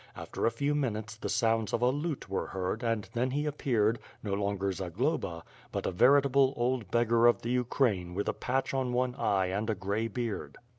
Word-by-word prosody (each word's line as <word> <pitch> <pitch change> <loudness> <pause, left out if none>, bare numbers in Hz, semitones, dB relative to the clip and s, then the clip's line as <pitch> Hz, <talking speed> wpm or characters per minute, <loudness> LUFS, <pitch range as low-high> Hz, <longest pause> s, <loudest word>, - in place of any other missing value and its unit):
After - - -2
a - - +2
few 140 +6 0
minutes 110 -7 -2
the 115 - -5
sounds 115 -2 +1
of 120 - +1
a 125 - +4
lute 145 +1 -3
were 100 - -2
heard 95 +4 -3
and 115 -4 -1
then 125 +2 +1
he 145 +3 -1
appeared 120 -7 +1
— - - -27
no 100 -3 -2
longer 100 -1 0
Za 95 0 -4
globa, 95 - -1 0.3
but - - -3
a - - 0
veritable 135 +5 +4
old 120 -4 0
beggar 120 +1 +4
of 120 - +3
the 120 - -2
Ukraine 115 -8 +1
with 100 - -2
a - - +1
patch 135 +2 -1
on 130 -2 0
one 125 0 +1
eye 95 -7 +1
and 105 +4 -2
a 110 - +1
grey 100 +4 -1
beard. 115 -1 -4
115 Hz, 210 wpm, -30 LUFS, 100-130 Hz, 0.3 s, a